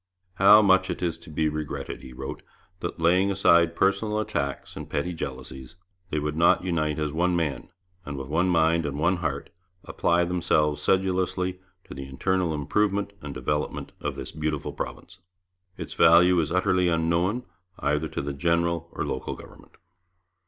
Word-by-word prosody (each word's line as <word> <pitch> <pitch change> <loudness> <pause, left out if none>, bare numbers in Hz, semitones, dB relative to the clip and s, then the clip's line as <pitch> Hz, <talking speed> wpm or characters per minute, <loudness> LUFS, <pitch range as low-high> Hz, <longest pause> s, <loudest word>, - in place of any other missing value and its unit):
'How 105 +3 +8
much 95 -1 +4
it - - -3
is 85 -2 0
to 85 - -14
be 80 0 0
regretted,' 75 -1 -4
he 65 - -11
wrote, 60 - -7 0.4
'that, - - -5
laying 90 +4 +3
aside 85 -4 +4
personal 105 +4 +1
attacks 70 -10 -3
and - - -8
petty 90 +5 -2
jealousies, 65 -4 -7 0.3
they 75 - -2
would 75 0 -2
not 85 +2 +4
unite 80 -4 -1
as 75 -2 -2
one 90 +2 +1
man, 80 -5 -2 0.3
and 70 -2 -6
with 65 -1 -6
one 85 +5 +1
mind 85 -1 +3
and 70 0 -4
one 85 +4 +2
heart 70 -5 -3 0.3
apply 85 +1 +1
themselves 80 -4 +1
sedulously 95 -1 0 0.2
to - - -11
the 70 0 -7
internal 90 +6 0
improvement 100 +7 0
and 70 -2 -7
development 75 +4 -2
of - - -3
this - - -6
beautiful 75 -2 -3
province. 90 +1 -7 0.6
Its - - -6
value 90 +2 +6
is 80 -2 -1
utterly 90 0 +2
unknown, 85 +7 +1 0.3
either 75 +2 0
to 70 - -4
the 70 0 -3
general 85 +2 0
or - - -3
local - - -4
government.' - - -15
85 Hz, 165 wpm, -26 LUFS, 75-90 Hz, 0.6 s, How